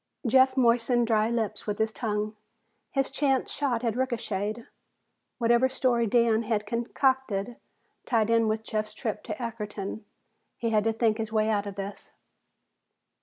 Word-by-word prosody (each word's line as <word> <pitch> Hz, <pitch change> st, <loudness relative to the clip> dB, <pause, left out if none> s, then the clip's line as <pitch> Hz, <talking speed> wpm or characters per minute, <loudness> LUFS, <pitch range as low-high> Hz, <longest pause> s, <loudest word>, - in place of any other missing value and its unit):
Jeff 260 Hz, +2 st, +4 dB
moistened 240 Hz, 0 st, +3 dB
dry 220 Hz, -1 st, +2 dB
lips 230 Hz, -3 st, -2 dB
with 205 Hz, -1 st, -1 dB
his 220 Hz, 0 st, +1 dB
tongue. 215 Hz, -2 st, -2 dB, 0.5 s
His 270 Hz, -1 st, 0 dB
chance 270 Hz, -1 st, +1 dB
shot 255 Hz, -5 st, -1 dB
had 230 Hz, -2 st, 0 dB
ricocheted; 230 Hz, -3 st, -2 dB, 0.7 s
whatever 240 Hz, +2 st, +3 dB
story 245 Hz, -3 st, +1 dB
Dan 230 Hz, 0 st, +3 dB
had 215 Hz, -2 st, -1 dB
concocted 240 Hz, -1 st, 0 dB, 0.5 s
tied 225 Hz, -2 st, +2 dB
in 230 Hz, -1 st, +4 dB
with 220 Hz, 0 st, -1 dB
Jeff's 215 Hz, -1 st, -3 dB
trip 220 Hz, -3 st, -3 dB
to 215 Hz, -, -4 dB
Ackerton. 215 Hz, -3 st, -5 dB, 0.5 s
He 230 Hz, -1 st, -1 dB
had 215 Hz, -1 st, +2 dB
to 225 Hz, -, +2 dB
think 220 Hz, -1 st, +1 dB
his 220 Hz, -1 st, -3 dB
way 215 Hz, 0 st, +2 dB
out 205 Hz, -1 st, 0 dB
of 200 Hz, -, -6 dB
this. 200 Hz, +1 st, -7 dB
225 Hz, 150 wpm, -27 LUFS, 215-240 Hz, 0.7 s, Jeff